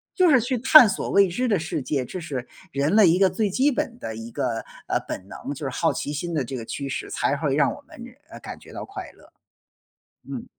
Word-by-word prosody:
就 365 Hz, -3 st, +5 dB
是 260 Hz, -4 st, +6 dB
去 250 Hz, +3 st, -1 dB
探 260 Hz, 0 st, +8 dB
索 190 Hz, -, -3 dB
未 200 Hz, 0 st, +5 dB
知 245 Hz, +9 st, -1 dB
的 205 Hz, -6 st, +2 dB
世 160 Hz, -1 st, -3 dB
界， 135 Hz, 0 st, -1 dB
这 155 Hz, +9 st, -6 dB
是 135 Hz, -7 st, -5 dB, 0.2 s
人 140 Hz, +7 st, +1 dB
类 215 Hz, -4 st, +7 dB
一 170 Hz, +2 st, +3 dB
个 195 Hz, -1 st, +5 dB
最 210 Hz, -1 st, -1 dB
基 270 Hz, +8 st, +3 dB
本 240 Hz, -2 st, -3 dB
的 110 Hz, -, -5 dB
一 115 Hz, +1 st, -8 dB
个， 115 Hz, -1 st, -2 dB, 0.2 s
呃， -, -, +1 dB
本 95 Hz, -, -6 dB
能， 140 Hz, -, -6 dB
就 145 Hz, -, -9 dB
是 135 Hz, -, -1 dB
好 125 Hz, -, 0 dB
奇 145 Hz, -, -4 dB
心 170 Hz, +4 st, -4 dB
的 150 Hz, -4 st, 0 dB
这 130 Hz, +2 st, -5 dB
个 115 Hz, -, -6 dB
驱 140 Hz, +4 st, -5 dB
使， -, -, -4 dB
才 145 Hz, -, 0 dB
会 140 Hz, -2 st, -1 dB
让 140 Hz, -1 st, +3 dB
我 290 Hz, -, -10 dB
们， 240 Hz, -, -12 dB, 0.3 s
呃， -, -, -9 dB
感 -, -, -9 dB
觉 -, -, -15 dB
到 -, -, -6 dB
快 385 Hz, -1 st, -8 dB
乐。 -, -, -21 dB, 1.0 s
嗯。 -, -, -5 dB
165 Hz, 265 characters per minute, -24 LUFS, -, 1.0 s, 探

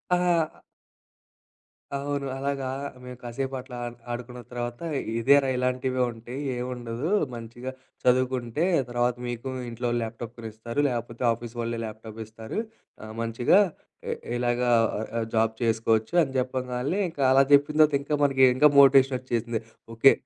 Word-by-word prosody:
ఆహ్ 175 Hz, -2 st, +3 dB, 1.5 s
అవును. 140 Hz, 0 st, -2 dB
అలాగా 135 Hz, -1 st, -2 dB, 0.4 s
మేము 125 Hz, -1 st, -8 dB
కాసేపట్లా 130 Hz, +1 st, -4 dB
అన్ 120 Hz, -, -8 dB, 0.2 s
ఆడుకున్న 125 Hz, 0 st, -6 dB
తర్వాత 120 Hz, 0 st, -4 dB, 0.4 s
"ఇదేరా 140 Hz, +3 st, +5 dB
ఇలాంటివే 125 Hz, 0 st, 0 dB
ఉంటాయి, 120 Hz, +4 st, -8 dB, 0.2 s
ఏం 125 Hz, -, -2 dB
ఉండదు. 120 Hz, +6 st, -4 dB, 0.3 s
మంచిగా 120 Hz, +3 st, -7 dB, 0.3 s
చదువుకుంటే 125 Hz, +2 st, +1 dB, 0.3 s
తర్వాత 120 Hz, 0 st, +1 dB
మీకు 120 Hz, +1 st, -5 dB
మీ 125 Hz, -, -4 dB
ఇంట్లో 120 Hz, +1 st, -3 dB
వాళ్ళు 120 Hz, 0 st, 0 dB
ల్యాప్‌టాప్ 115 Hz, +1 st, -6 dB
కొనిస్తారు. 115 Hz, +4 st, -5 dB
లేపోతే 120 Hz, 0 st, -4 dB
ఆఫీస్ 120 Hz, +1 st, -9 dB
వాళ్ళే 115 Hz, 0 st, -2 dB
ల్యాప్‌టాపిస్తారు. 110 Hz, -, -7 dB, 0.4 s
ఆహ్, 110 Hz, 0 st, -8 dB
మంచిగా 115 Hz, -, +3 dB, 0.5 s
ఇ -, -, +1 dB, 0.2 s
ఇలాగా 120 Hz, 0 st, +1 dB, 0.3 s
అ -, -, -2 dB, 0.2 s
అ -, -, 0 dB
జాబ్ 110 Hz, 0 st, +3 dB
చేసుకోవచ్చు" 110 Hz, +3 st, +1 dB
అని 135 Hz, -2 st, -5 dB
చెప్పగాల్నే 130 Hz, +6 st, -2 dB
ఇంకా 145 Hz, -4 st, -3 dB
అలా 135 Hz, +1 st, +6 dB
చెప్పిన 145 Hz, +2 st, +4 dB
తర్వాత 155 Hz, -2 st, +6 dB
ఇంకా 150 Hz, +1 st, -1 dB
మనకి, 135 Hz, -1 st, +3 dB
ఇంకా 150 Hz, +2 st, +7 dB
మోటివేషన్ 135 Hz, -1 st, +6 dB
ఒచ్చేసింది. 120 Hz, -2 st, -2 dB, 0.3 s
ఓకే 135 Hz, +4 st, +7 dB
125 Hz, 135 wpm, -26 LUFS, 115-135 Hz, 1.5 s, ఇంకా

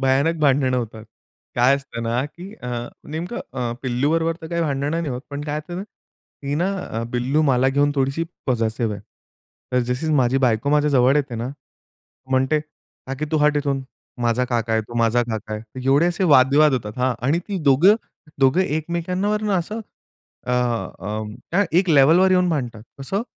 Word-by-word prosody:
भयानक 135 Hz, +5 st, +2 dB
भांडणं 135 Hz, -3 st, +3 dB
होतात. 110 Hz, -2 st, -4 dB, 0.5 s
काय 125 Hz, +3 st, +5 dB
असतं 140 Hz, -4 st, -7 dB
ना, 120 Hz, +3 st, 0 dB
की 180 Hz, +7 st, -11 dB
अ, 125 Hz, -, -5 dB, 0.4 s
नेमकं 165 Hz, +8 st, -4 dB
अ, 125 Hz, -3 st, -2 dB
पिल्लूबरोबर 150 Hz, +6 st, 0 dB
तर 160 Hz, -, -7 dB
काही 170 Hz, -1 st, -1 dB
भांडणं 140 Hz, -1 st, -1 dB
नाही 165 Hz, -1 st, -1 dB
होत, 125 Hz, -1 st, -3 dB
पण 140 Hz, -, -4 dB
काय 150 Hz, 0 st, -2 dB
असते 155 Hz, +3 st, -8 dB
ना, 185 Hz, -, -4 dB
ती 145 Hz, -7 st, -10 dB
ना 175 Hz, +6 st, +1 dB, 0.2 s
अ, 115 Hz, +1 st, -3 dB
पिल्लू 130 Hz, +6 st, +1 dB
मला 130 Hz, -2 st, +3 dB
घेऊन 145 Hz, +2 st, +2 dB
थोडीशी 135 Hz, +4 st, 0 dB, 0.2 s
पसेसिव्ह 115 Hz, -3 st, 0 dB
आहे. 100 Hz, -, -10 dB, 0.7 s
तर 125 Hz, -, +3 dB
जशी 145 Hz, +6 st, -3 dB
माझी 130 Hz, -1 st, +3 dB
बायको 125 Hz, +1 st, +1 dB
माझ्याजवळ 145 Hz, -2 st, +4 dB
येते 140 Hz, -4 st, -1 dB
ना 115 Hz, +2 st, -3 dB, 0.8 s
म्हणते, 130 Hz, +4 st, +2 dB, 0.5 s
"काकी 135 Hz, +3 st, -3 dB
तू -, -, +3 dB
हट 150 Hz, 0 st, +3 dB
ईथून, 140 Hz, -2 st, 0 dB, 0.4 s
माझा 120 Hz, +2 st, +2 dB
काका 115 Hz, -2 st, -1 dB
आहे, 110 Hz, 0 st, +2 dB
तो 120 Hz, +2 st, -12 dB
माझा 115 Hz, +1 st, +3 dB
काका 110 Hz, -2 st, -5 dB
आहे." 110 Hz, +4 st, -8 dB
एवढे 140 Hz, +5 st, +4 dB
असे 175 Hz, +2 st, 0 dB
वाद-विवाद 145 Hz, 0 st, +5 dB
होतात, 105 Hz, -5 st, -2 dB
हां 130 Hz, 0 st, +2 dB
आणि 155 Hz, +5 st, +2 dB
ती 200 Hz, -, -2 dB
दोघं 150 Hz, +9 st, +6 dB, 0.5 s
दोघं 135 Hz, +6 st, +4 dB
एकमेकांवरून 180 Hz, +6 st, -1 dB
असं 200 Hz, +4 st, -1 dB, 0.7 s
अ, -, -, -2 dB
अं, 110 Hz, -3 st, -2 dB, 0.2 s
त्या 200 Hz, +4 st, +3 dB
एक 185 Hz, -1 st, +1 dB
लेव्हलवर 160 Hz, +6 st, +6 dB
येऊन 180 Hz, -1 st, +3 dB
भांडतात. 120 Hz, -9 st, -2 dB, 0.2 s
कसं? 195 Hz, +10 st, -2 dB
135 Hz, 170 wpm, -22 LUFS, 125-160 Hz, 0.8 s, दोघं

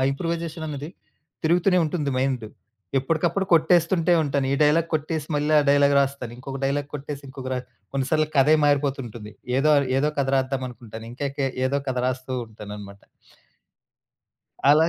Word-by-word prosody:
ఆ -, -, +2 dB
ఇంప్రూవైజేషననేది. 160 Hz, -1 st, -4 dB, 0.5 s
తిరుగుతూనే 180 Hz, +3 st, +3 dB
ఉంటుంది 150 Hz, -2 st, -1 dB
మైండ్. 130 Hz, -3 st, 0 dB, 0.5 s
ఎప్పడుకప్పుడు 165 Hz, +7 st, 0 dB
కొట్టేస్తుంటే 170 Hz, +1 st, +3 dB
ఉంటాను. 140 Hz, -2 st, 0 dB
ఈ -, -, +2 dB
డైలాగ్ 155 Hz, +3 st, +4 dB
కొట్టేసి 155 Hz, 0 st, -2 dB
మళ్ళీ 150 Hz, +1 st, 0 dB
ఆ -, -, +2 dB
డైలాగ్ 145 Hz, 0 st, +4 dB
రాస్తాను. 135 Hz, -3 st, -2 dB
ఇంకొక 135 Hz, +1 st, -6 dB
డైలాగ్ 140 Hz, +1 st, -1 dB
కొట్టేసి 145 Hz, 0 st, -6 dB
ఇంకొక 130 Hz, -1 st, -7 dB
ర -, -, -1 dB, 0.3 s
కొన్ని 135 Hz, -1 st, -1 dB
సార్లు 155 Hz, 0 st, +3 dB
కథే 140 Hz, +3 st, +6 dB
మారిపోతుంటుంది. 135 Hz, -7 st, -1 dB, 0.3 s
ఏదో 145 Hz, +3 st, +3 dB
అను 140 Hz, -2 st, +2 dB
ఏదో 150 Hz, +2 st, +2 dB
కథ 135 Hz, -1 st, +1 dB
రాద్దామనుకుంటాను. 125 Hz, -4 st, -4 dB
ఇంకెకె 140 Hz, +1 st, -2 dB, 0.2 s
ఏదో 140 Hz, +2 st, 0 dB
కథ 130 Hz, -1 st, -1 dB
రాస్తూ 130 Hz, 0 st, -3 dB, 0.2 s
ఉంటాననమాట. 105 Hz, -2 st, -10 dB, 1.7 s
అలా 155 Hz, +3 st, +5 dB
140 Hz, 140 wpm, -24 LUFS, 130-155 Hz, 1.7 s, కథే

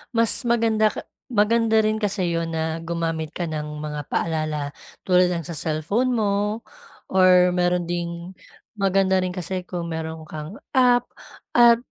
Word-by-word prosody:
Mas 230 Hz, -1 st, +4 dB, 0.2 s
maganda 225 Hz, -2 st, +3 dB, 0.4 s
maganda 225 Hz, 0 st, +2 dB
rin 215 Hz, 0 st, +1 dB
kasi 195 Hz, -4 st, -1 dB
'yon 165 Hz, 0 st, -1 dB
na 160 Hz, 0 st, -2 dB
gumamit 165 Hz, -2 st, -3 dB
ka 175 Hz, -, -2 dB
ng 150 Hz, -1 st, -5 dB
mga 150 Hz, -1 st, -5 dB
paalala 155 Hz, -3 st, -2 dB, 0.3 s
tulad 180 Hz, -1 st, +4 dB
ng 170 Hz, -2 st, -2 dB
sa 170 Hz, -, -6 dB
cellphone 160 Hz, -, 0 dB
mo 210 Hz, +1 st, 0 dB, 0.5 s
or 185 Hz, -1 st, +5 dB
meron 175 Hz, -1 st, +1 dB
ding 170 Hz, +1 st, -4 dB, 0.5 s
maganda 190 Hz, -1 st, +2 dB
rin 185 Hz, 0 st, -2 dB
kasi 185 Hz, +1 st, -3 dB
kung 170 Hz, -2 st, -4 dB
meron 160 Hz, 0 st, -5 dB
kang 155 Hz, +5 st, -8 dB, 0.2 s
app, 245 Hz, -2 st, +4 dB, 0.5 s
at 235 Hz, -1 st, +7 dB
180 Hz, 140 wpm, -23 LUFS, 160-210 Hz, 0.5 s, at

